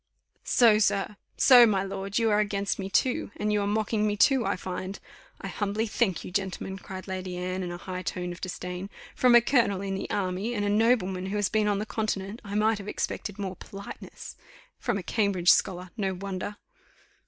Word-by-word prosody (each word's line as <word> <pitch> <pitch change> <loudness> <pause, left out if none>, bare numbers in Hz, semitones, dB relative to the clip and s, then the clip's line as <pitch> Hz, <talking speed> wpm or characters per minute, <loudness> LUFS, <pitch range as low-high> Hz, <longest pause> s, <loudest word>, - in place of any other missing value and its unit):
"So, 225 -4 +5
sir! 200 0 +1 0.2
So, 245 -3 +8
my 195 -3 +1
lord, 195 +1 -4
you 225 -2 +3
are 210 - +3
against 200 -1 -1
me 195 0 -4
too, 250 +5 +1
and 210 0 0
you 210 - +2
are 200 - -1
mocking 215 0 0
me 205 0 -1
too, 265 +2 +4
I - - 0
find. 185 +1 -5 0.4
I - - -6
humbly 210 +2 -1
thank 210 -4 0
you, - - -7
gentlemen," 190 0 -3
cried 190 0 -8
Lady 185 -1 -4
Anne, 185 +1 -3
in 180 -1 -4
a 175 - -5
high 180 +1 -6
tone 180 0 -3
of 175 - -9
disdain; 180 +1 -5 0.2
"from 250 -1 +5
a 240 - +9
colonel 230 -6 +2
in 195 -1 -3
the 195 - -4
army, 195 +4 -2
and 205 -1 -1
a - - +1
nobleman 205 -4 +2
who 195 - -3
has 205 -2 +1
been 215 -1 +1
on 205 -1 +2
the 210 - -2
continent, 215 -1 -3
I 200 -1 -6
might 215 +1 +2
have 200 - -9
expected 205 -1 -3
more 190 -2 -4
politeness. 200 0 -9 0.4
From 240 -5 -1
a 190 - -5
Cambridge 195 -4 +3
scholar 180 -1 +1
no 195 -4 -1
wonder!" 195 +2 -5
200 Hz, 205 wpm, -27 LUFS, 185-215 Hz, 0.4 s, a